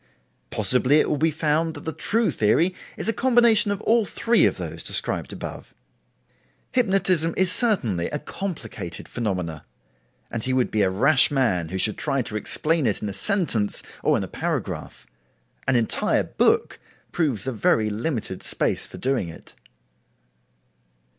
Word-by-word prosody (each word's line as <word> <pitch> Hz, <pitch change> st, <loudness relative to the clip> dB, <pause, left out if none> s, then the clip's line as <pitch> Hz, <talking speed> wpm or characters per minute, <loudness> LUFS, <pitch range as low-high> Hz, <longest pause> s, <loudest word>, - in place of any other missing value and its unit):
Possibly 130 Hz, +3 st, +5 dB
it -, -, +1 dB
will 150 Hz, -, -1 dB
be 160 Hz, -, +2 dB
found 160 Hz, +1 st, -1 dB
that 145 Hz, -, -10 dB
the 160 Hz, -, -3 dB
true 225 Hz, +8 st, 0 dB
theory 165 Hz, -, +1 dB, 0.2 s
is -, -, -4 dB
a 225 Hz, -, +1 dB
combination 235 Hz, -4 st, +3 dB
of 200 Hz, -1 st, -2 dB
all 230 Hz, 0 st, +2 dB
three 230 Hz, +3 st, +2 dB
of -, -, -3 dB
those -, -, -6 dB
described -, -, 0 dB
above. -, -, -9 dB, 1.0 s
Hypnotism 190 Hz, -, +1 dB
is 185 Hz, -1 st, +3 dB
certainly 120 Hz, -, +1 dB
a 150 Hz, -, -3 dB
complicated 140 Hz, -, -7 dB
phenomena, 90 Hz, -9 st, -4 dB, 0.7 s
and 115 Hz, -2 st, -4 dB
he 130 Hz, -, -1 dB
would 130 Hz, -1 st, 0 dB
be 110 Hz, -, +1 dB
a 95 Hz, -, +3 dB
rash 130 Hz, +9 st, +5 dB
man 105 Hz, -, 0 dB
who 95 Hz, -, -4 dB
should 105 Hz, +2 st, +1 dB
try 135 Hz, -2 st, -1 dB
to 110 Hz, -, -6 dB
explain 155 Hz, +7 st, 0 dB
it 105 Hz, -, -2 dB
in 105 Hz, -, -2 dB
a -, -, -6 dB
sentence 115 Hz, -, 0 dB, 0.2 s
or -, -, +2 dB
in -, -, -3 dB
a -, -, -5 dB
paragraph. -, -, -5 dB, 0.6 s
An 130 Hz, -, +2 dB
entire 115 Hz, -2 st, +2 dB
book -, -, +1 dB, 0.3 s
proves 140 Hz, -, -1 dB
a 135 Hz, -, -2 dB
very 110 Hz, -1 st, +1 dB
limited 110 Hz, -, -4 dB
space -, -, 0 dB
for -, -, -11 dB
doing 130 Hz, -9 st, -1 dB
it. 80 Hz, -, -13 dB
135 Hz, 160 wpm, -23 LUFS, 105-180 Hz, 1.0 s, Possibly